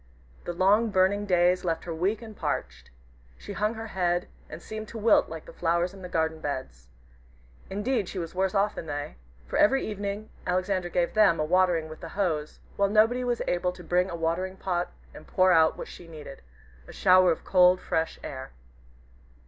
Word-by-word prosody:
The 175 Hz, -, -3 dB
long 200 Hz, +6 st, +3 dB
burning 200 Hz, +1 st, +2 dB
days 180 Hz, 0 st, +3 dB
left 165 Hz, -2 st, -1 dB
her 170 Hz, -, -5 dB
weak 195 Hz, +8 st, -1 dB
and 220 Hz, -2 st, -10 dB
parched. 70 Hz, -, -4 dB, 0.5 s
She 205 Hz, -, -8 dB
hung 210 Hz, +3 st, -1 dB
her 225 Hz, 0 st, -6 dB
head, 180 Hz, -4 st, -1 dB, 0.2 s
and 155 Hz, -, -8 dB
seemed 215 Hz, +4 st, -7 dB
to 230 Hz, -, -8 dB
wilt 220 Hz, 0 st, +4 dB
like 160 Hz, -1 st, -8 dB
the -, -, -12 dB
flowers 170 Hz, +2 st, 0 dB
in 195 Hz, -, -12 dB
the 180 Hz, -, -7 dB
garden 160 Hz, -1 st, -1 dB
beds. 100 Hz, -, -5 dB, 0.8 s
Indeed 205 Hz, +1 st, -1 dB
she -, -, -7 dB
was 165 Hz, -2 st, -4 dB
worse 190 Hz, +1 st, 0 dB
off 205 Hz, +1 st, +2 dB
than 160 Hz, -, -7 dB
they, 145 Hz, -, -5 dB, 0.3 s
for -, -, -3 dB
every 270 Hz, +5 st, +4 dB
evening 205 Hz, 0 st, -4 dB, 0.2 s
Alexander 185 Hz, 0 st, 0 dB
gave 175 Hz, 0 st, 0 dB
them 210 Hz, -6 st, +4 dB
a 155 Hz, -, +1 dB
watering 175 Hz, -1 st, +2 dB
with 155 Hz, 0 st, -10 dB
the 165 Hz, -, -7 dB
hose, 160 Hz, -7 st, -2 dB, 0.2 s
while 200 Hz, 0 st, +2 dB
nobody 225 Hz, +4 st, +3 dB
was 245 Hz, -1 st, -1 dB
able 180 Hz, 0 st, 0 dB
to 180 Hz, -, -12 dB
bring 180 Hz, +2 st, +1 dB
a 170 Hz, -, -4 dB
watering 170 Hz, +3 st, -2 dB
pot 180 Hz, -2 st, -2 dB, 0.2 s
and -, -, -13 dB
pour 185 Hz, 0 st, +3 dB
out 160 Hz, -2 st, +4 dB
what -, -, -6 dB
she 175 Hz, -, -12 dB
needed 150 Hz, -4 st, -10 dB, 0.5 s
a -, -, -10 dB
shower 185 Hz, -1 st, +5 dB
of 160 Hz, -, -4 dB
cold, 180 Hz, 0 st, +5 dB
fresh 160 Hz, 0 st, -2 dB
air. 130 Hz, -1 st, -7 dB
180 Hz, 195 wpm, -27 LUFS, 165-200 Hz, 0.8 s, shower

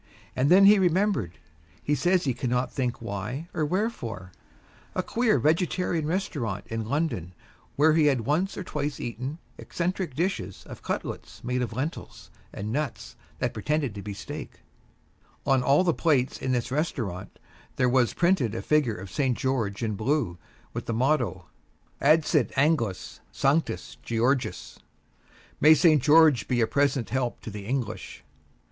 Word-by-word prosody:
And 135 Hz, +3 st, +2 dB
then 195 Hz, +2 st, +7 dB
he 205 Hz, 0 st, +7 dB
remembered 180 Hz, -, +1 dB, 0.5 s
he 145 Hz, -, 0 dB
says 175 Hz, +6 st, +2 dB
he 130 Hz, -, 0 dB
cannot 125 Hz, 0 st, -1 dB
think 125 Hz, -3 st, -2 dB
why 110 Hz, -, -4 dB
or 155 Hz, -, -1 dB
wherefore 145 Hz, -, -3 dB, 0.6 s
a -, -, 0 dB
queer 230 Hz, -7 st, +2 dB
vegetarian 160 Hz, +3 st, +1 dB
restaurant 140 Hz, -, -2 dB
in 115 Hz, -1 st, -4 dB
London 140 Hz, -, -1 dB, 0.4 s
where 155 Hz, +2 st, +4 dB
he 155 Hz, -2 st, +4 dB
had 135 Hz, -5 st, +2 dB
once 155 Hz, -, 0 dB
or 190 Hz, -, -4 dB
twice 145 Hz, -4 st, -3 dB
eaten 130 Hz, +6 st, -5 dB, 0.2 s
eccentric 175 Hz, -4 st, -3 dB
dishes 120 Hz, -, -2 dB
of -, -, -10 dB
cutlets -, -, -5 dB
made 125 Hz, +1 st, -1 dB
of 120 Hz, -, -2 dB
lentils 135 Hz, +8 st, -5 dB, 0.2 s
and 105 Hz, +2 st, -5 dB
nuts 145 Hz, -2 st, -4 dB, 0.2 s
that -, -, -1 dB
pretended 150 Hz, -6 st, -1 dB
to 100 Hz, -, -7 dB
be 100 Hz, 0 st, -6 dB
steak. -, -, -8 dB, 0.8 s
On 135 Hz, -2 st, +3 dB
all 140 Hz, +7 st, +4 dB
the 170 Hz, -3 st, +2 dB
plates 140 Hz, -7 st, +1 dB
in 130 Hz, -, -1 dB
this 125 Hz, -1 st, -1 dB
restaurant 120 Hz, -, -3 dB, 0.4 s
there 125 Hz, -, +2 dB
was 125 Hz, -1 st, +2 dB
printed 170 Hz, -, +2 dB
a -, -, -4 dB
figure 150 Hz, -8 st, +2 dB
of 95 Hz, 0 st, -9 dB
St. 130 Hz, -1 st, 0 dB
George 115 Hz, -5 st, -1 dB
in 110 Hz, -2 st, -1 dB
blue, 110 Hz, -, -1 dB, 0.3 s
with -, -, -5 dB
the 115 Hz, -, -1 dB
motto, 125 Hz, -, 0 dB, 0.6 s
"Adsit 155 Hz, -2 st, +3 dB
Anglis 135 Hz, -, 0 dB
Sanctus 145 Hz, +4 st, 0 dB
Georgius" 120 Hz, +3 st, -1 dB, 0.8 s
"May 155 Hz, +2 st, +7 dB
St. 155 Hz, -1 st, +5 dB
George 150 Hz, -4 st, +5 dB
be 125 Hz, -2 st, +1 dB
a 115 Hz, -, +4 dB
present 135 Hz, -4 st, 0 dB
help 125 Hz, -2 st, -1 dB
to 110 Hz, -, -7 dB
the 100 Hz, 0 st, -8 dB
English." 120 Hz, -4 st, -4 dB
135 Hz, 155 wpm, -26 LUFS, 115-155 Hz, 0.8 s, then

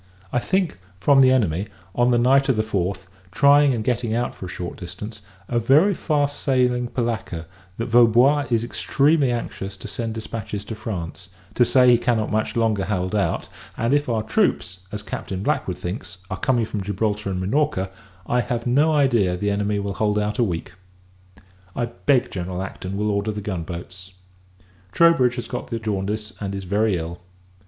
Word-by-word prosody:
I 125 Hz, -, +3 dB
think, 185 Hz, -, 0 dB, 0.2 s
from 135 Hz, +7 st, +5 dB
the 130 Hz, -, +7 dB
enemy, 100 Hz, -6 st, +1 dB, 0.3 s
on 120 Hz, 0 st, +3 dB
the 120 Hz, -, +3 dB
night 135 Hz, +3 st, +4 dB
of 130 Hz, -, +4 dB
the 110 Hz, -, +1 dB
fourth, 95 Hz, -2 st, -2 dB, 0.3 s
trying 140 Hz, +4 st, +5 dB
and 115 Hz, -4 st, -1 dB
getting 115 Hz, -1 st, 0 dB
out 120 Hz, +1 st, -1 dB
for 95 Hz, -, -8 dB
a -, -, -8 dB
short 90 Hz, 0 st, -5 dB
distance, 105 Hz, +4 st, -8 dB, 0.3 s
a 120 Hz, -, +1 dB
very 150 Hz, -, +4 dB
fast 145 Hz, -4 st, 0 dB
sailing 125 Hz, -2 st, +1 dB
polacca, 115 Hz, -9 st, -3 dB, 0.3 s
that 115 Hz, -, -2 dB
Vaubois 120 Hz, +5 st, +5 dB
is 115 Hz, -2 st, +1 dB
extremely 140 Hz, +3 st, +2 dB
anxious 100 Hz, -4 st, -4 dB
to 100 Hz, -, -8 dB
send 115 Hz, +1 st, -4 dB
dispatches 110 Hz, -2 st, -5 dB
to 110 Hz, -, -5 dB
France, 95 Hz, -5 st, -6 dB, 0.2 s
to 120 Hz, -, +4 dB
say 125 Hz, +1 st, +4 dB
he 120 Hz, -1 st, +6 dB
cannot 115 Hz, -3 st, 0 dB
much 110 Hz, +1 st, -1 dB
longer 110 Hz, -4 st, +1 dB
hold 95 Hz, -1 st, -2 dB
out: 105 Hz, -2 st, 0 dB, 0.3 s
and, 115 Hz, +3 st, +1 dB
if 145 Hz, -2 st, +1 dB
our 110 Hz, -2 st, 0 dB
troops, 95 Hz, -3 st, 0 dB
as 105 Hz, 0 st, -5 dB
Captain 95 Hz, -2 st, -5 dB
Blackwood 130 Hz, -, -1 dB
thinks, 90 Hz, +2 st, -6 dB
are 95 Hz, -, -2 dB
coming 120 Hz, -1 st, +1 dB
from 105 Hz, -2 st, -4 dB
Gibraltar 105 Hz, +1 st, -2 dB
and 95 Hz, -1 st, -2 dB
Minorca, 95 Hz, -1 st, 0 dB, 0.3 s
I 125 Hz, 0 st, +1 dB
have 120 Hz, +1 st, -3 dB
no 145 Hz, +6 st, +3 dB
idea 120 Hz, -11 st, +3 dB
the 105 Hz, +2 st, 0 dB
enemy 105 Hz, +1 st, 0 dB
will 100 Hz, 0 st, -2 dB
hold 105 Hz, +1 st, 0 dB
out 105 Hz, +3 st, -1 dB
a -, -, +5 dB
week. 90 Hz, -5 st, -3 dB, 1.0 s
I 120 Hz, -, 0 dB
beg 120 Hz, +2 st, +1 dB
General 90 Hz, 0 st, -4 dB
Acton 95 Hz, 0 st, -6 dB
will 105 Hz, +1 st, 0 dB
order 100 Hz, +1 st, 0 dB
the 105 Hz, -, -5 dB
gun 95 Hz, -4 st, -3 dB
boats. 90 Hz, +2 st, -9 dB, 0.8 s
Troubridge 160 Hz, -8 st, +4 dB
has 120 Hz, -2 st, -5 dB
got 125 Hz, +1 st, -5 dB
the 115 Hz, -, -3 dB
jaundice, 105 Hz, 0 st, -3 dB
and 100 Hz, -1 st, -3 dB
is 95 Hz, -, -5 dB
very 100 Hz, +1 st, +1 dB
ill. 85 Hz, +1 st, -6 dB
110 Hz, 185 wpm, -23 LUFS, 95-125 Hz, 1.0 s, the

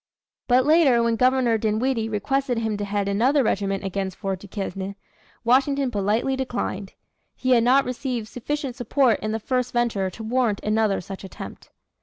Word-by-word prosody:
But 250 Hz, +1 st, +4 dB
later 290 Hz, -6 st, +5 dB
when 230 Hz, 0 st, +2 dB
Governor 250 Hz, -2 st, +3 dB
Dinwiddie 225 Hz, +2 st, 0 dB
requested 260 Hz, +4 st, -1 dB
him 220 Hz, -2 st, -1 dB
to 205 Hz, -, -3 dB
head 200 Hz, 0 st, -1 dB
another 250 Hz, +8 st, +3 dB
regiment 195 Hz, -2 st, -1 dB
against 190 Hz, -1 st, -3 dB
Fort 195 Hz, -2 st, -3 dB
Duquesne, 195 Hz, 0 st, -5 dB, 0.5 s
Washington 270 Hz, +2 st, +2 dB
politely 215 Hz, +5 st, 0 dB
declined. 240 Hz, -7 st, -3 dB, 0.4 s
He 255 Hz, -, -1 dB
had 235 Hz, -2 st, +5 dB
not 260 Hz, +3 st, +4 dB
received 250 Hz, -3 st, -3 dB
sufficient 270 Hz, +2 st, -4 dB
support 250 Hz, -1 st, +2 dB
in 215 Hz, -, -3 dB
the 220 Hz, -, -2 dB
first 250 Hz, +2 st, -1 dB
venture 230 Hz, -6 st, 0 dB
to 220 Hz, +4 st, -9 dB
warrant 230 Hz, -2 st, +1 dB
another 215 Hz, -1 st, +1 dB
such 195 Hz, +2 st, -8 dB
attempt. 190 Hz, -, -9 dB
230 Hz, 160 wpm, -24 LUFS, 205-255 Hz, 0.5 s, later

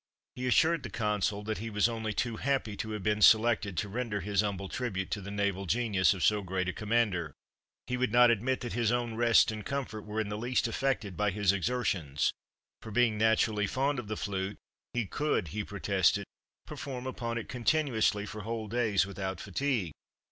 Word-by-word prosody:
He 125 Hz, 0 st, -3 dB
assured 160 Hz, +5 st, +3 dB
the -, -, -6 dB
Consul 105 Hz, -1 st, -1 dB
that 110 Hz, +1 st, -3 dB
he 115 Hz, +2 st, -4 dB
was 105 Hz, +1 st, +2 dB
only 110 Hz, -2 st, -3 dB
too 115 Hz, +1 st, -2 dB
happy 135 Hz, -6 st, -1 dB
to 110 Hz, -, -4 dB
have 105 Hz, -3 st, -5 dB
been 105 Hz, +1 st, +1 dB
selected 110 Hz, -3 st, +5 dB
to 105 Hz, -, 0 dB
render 110 Hz, 0 st, -2 dB
his 100 Hz, +1 st, +1 dB
humble 100 Hz, -2 st, -3 dB
tribute 95 Hz, -5 st, -3 dB
to 105 Hz, -, -2 dB
the 100 Hz, -, -7 dB
naval 100 Hz, -1 st, -1 dB
genius 105 Hz, -3 st, +2 dB
of 90 Hz, -, -4 dB
so 105 Hz, -1 st, +3 dB
great 95 Hz, -1 st, -2 dB
a 95 Hz, -, -1 dB
commander; 105 Hz, -8 st, 0 dB, 0.5 s
he 125 Hz, -, -2 dB
would 125 Hz, -3 st, 0 dB
not 120 Hz, +1 st, +7 dB
admit 125 Hz, +4 st, 0 dB
that 120 Hz, -, -4 dB
his 120 Hz, -2 st, +1 dB
own 120 Hz, -1 st, 0 dB
rest 115 Hz, 0 st, +4 dB
and 110 Hz, -1 st, -6 dB
comfort 130 Hz, -5 st, -4 dB
were 105 Hz, +1 st, -4 dB
in 110 Hz, -2 st, -1 dB
the 105 Hz, 0 st, -4 dB
least 120 Hz, +1 st, +1 dB
affected 115 Hz, -5 st, -1 dB
by 105 Hz, +2 st, +1 dB
his 100 Hz, -1 st, +2 dB
exertions, 95 Hz, -, 0 dB, 0.5 s
for, -, -, -9 dB
being 115 Hz, 0 st, +2 dB
naturally 110 Hz, -1 st, +2 dB
fond 135 Hz, +4 st, 0 dB
of 115 Hz, -, -7 dB
the 110 Hz, 0 st, -3 dB
flute, 100 Hz, -1 st, -3 dB, 0.4 s
he 120 Hz, -2 st, +1 dB
could, 145 Hz, -, -1 dB
he 105 Hz, +7 st, -3 dB
protested, 100 Hz, -1 st, +1 dB, 0.4 s
perform 130 Hz, -3 st, -6 dB
upon 120 Hz, -2 st, -3 dB
it 115 Hz, -, -5 dB
continuously 120 Hz, -5 st, +1 dB
for 105 Hz, +1 st, -7 dB
whole 110 Hz, +1 st, -4 dB
days 110 Hz, -4 st, +2 dB
without 95 Hz, -2 st, -4 dB
fatigue. 105 Hz, -, -1 dB
110 Hz, 195 wpm, -30 LUFS, 100-120 Hz, 0.5 s, not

